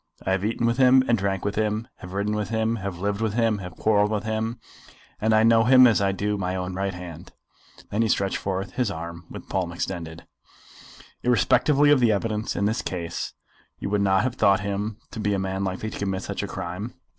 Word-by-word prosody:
I 95 - 0
have 95 0 0
eaten 115 +2 0
with 115 +1 +1
him 130 0 +6
and 115 - +4
drank 95 -2 -2
with 100 - 0
him, 110 +2 -1
have 90 0 -10
ridden 100 +2 -1
with 105 -1 -2
him, 110 0 0
have 95 -3 -5
lived 100 +3 -2
with 110 -2 -1
him, 115 -3 +2
and - - -7
have 90 -2 -8
quarrelled 105 -1 +3
with 105 -1 -1
him; 110 +2 -2 0.6
and 110 +1 +2
I 110 0 +5
know 115 0 +5
him 130 +1 +8
as 115 -4 +4
I 100 0 +2
do 105 +2 -2
my 90 0 -2
own 90 0 -3
right 95 0 -2
hand." 90 -3 -9 0.6
Then 105 - +1
he 115 - +2
stretched 100 -1 +1
forth 95 0 -3
his 125 -4 0
arm 85 -1 -7
with - - -8
the - - -28
palm 90 -3 -1
extended. 85 -1 -5 1.0
"Irrespectively 145 +4 +3
of 145 - +5
the 120 -3 +4
evidence 105 +1 -1
in 100 - 0
this 110 +4 0
case 85 -2 -4 0.4
you 100 - -5
would 105 -1 +2
not 95 -1 +3
have 130 0 -2
thought 95 -1 +4
him 100 +1 -3
to - - -7
be 105 -1 +1
a - - -1
man 95 0 -2
likely 95 +3 -3
to - - -7
commit 95 -1 -2
such - - -4
a - - -3
crime?" 90 +7 -5
100 Hz, 230 wpm, -25 LUFS, 95-110 Hz, 1.0 s, him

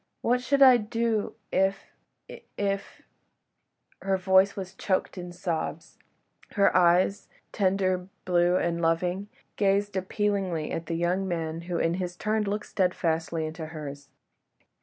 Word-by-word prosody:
What 250 +1 +2
should 275 +2 +4
I 255 -2 +8
do 225 -1 -1 0.2
if... 190 +1 0 0.3
if... - - -10 0.2
if.. 200 -1 -3 0.4
." - - -42
Her 195 0 +1
voice 190 +1 +4
was 190 -1 -6
choked 190 -1 -1
in 175 -1 -7
sobs, 170 -2 -4 0.5
her 200 -2 +3
eyes, 180 +2 +3 0.2
tender, 185 -2 +1 0.2
blue 175 0 +3
and 170 -1 -1
loving, 175 +4 0 0.3
gazed 200 0 +1
appealingly 190 -4 -1
at 165 - -4
the 165 - -2
young 180 +3 0
man, 165 -2 -3
who 175 - -1
in 165 0 +1
his 175 -1 -4
turn 215 +2 0
looked 210 +1 -2
steadfastly 165 -4 -1
into 160 0 -6
hers. 145 -3 -8
185 Hz, 140 wpm, -27 LUFS, 170-200 Hz, 0.5 s, I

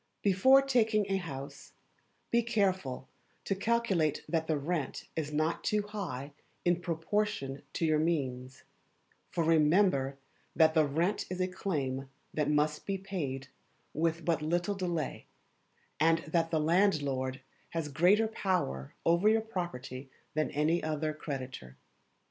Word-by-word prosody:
Before 260 +8 +6
taking 225 -6 +2
a 195 - +3
house, 140 -7 -7 0.6
be 235 - +4
careful 190 - 0 0.4
to - - +1
calculate 195 -7 +1
that 160 -1 0
the 155 - +1
rent 150 -1 -3
is 150 -2 -2
not 155 +2 0
too 210 -1 +1
high 180 -10 -5 0.3
in 175 0 +2
proportion 165 -5 -1
to 165 - 0
your 155 -1 +3
means; 130 -6 -2 0.7
for 170 - 0
remember 155 -3 +3 0.4
that 160 -1 +5
the 155 -2 +4
rent 170 +8 0
is 185 0 -4
a 185 - +2
claim 135 -8 -3 0.2
that 150 -1 0
must 150 0 +1
be 195 -1 0
paid 145 -9 -4 0.4
with 165 +2 0
but 165 -2 +1
little 175 +5 0
delay, 175 -5 -3 0.7
and 165 +2 +5
that 165 +1 +1
the 160 - +1
landlord 145 -6 +1 0.3
has 165 -2 -2
greater 180 +10 +4
power 180 - -2
over 170 +5 +4
your 220 0 +4
property 140 - -5 0.2
than 155 +1 0
any 155 +4 +1
other 155 0 -1
creditor. 130 - -6
165 Hz, 135 wpm, -31 LUFS, 145-190 Hz, 0.7 s, Before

